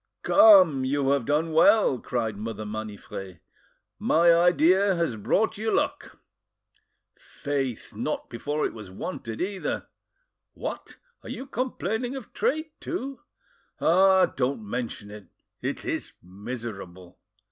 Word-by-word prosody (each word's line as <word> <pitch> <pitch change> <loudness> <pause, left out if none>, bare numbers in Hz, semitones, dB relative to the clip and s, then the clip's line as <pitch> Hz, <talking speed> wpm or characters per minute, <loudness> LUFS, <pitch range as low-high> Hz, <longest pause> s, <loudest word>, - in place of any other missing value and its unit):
"Come, 185 - +7
you 135 +1 0
have 140 -5 0
done 155 +2 +1
well," 200 - +5
cried 115 -4 -2
Mother 110 +1 -5
Maniffret; 105 -4 -7 0.6
"my 170 +1 +4
idea 180 +3 +4
has 165 -8 -1
brought 205 - 0
you 220 0 -1
luck." - - -1 1.0
"Faith! 135 -5 -4
not - - -3
before 145 +6 -2
it - - -3
was 110 -4 -10
wanted, 115 - -6
either!" 190 +1 -3 0.7
"What! - - -6 0.2
are - - -11
you 265 - -6
complaining 255 -1 -3
of 260 -6 -9
trade 310 +2 -1
too?" 275 -6 -5 0.6
"Ah! 190 +2 +5
don't 125 -4 -2
mention 115 -3 -5
it; 105 -2 -11 0.3
it - - -4
is - - -3
miserable!" 95 -3 -8
145 Hz, 120 wpm, -26 LUFS, -, 1.0 s, Come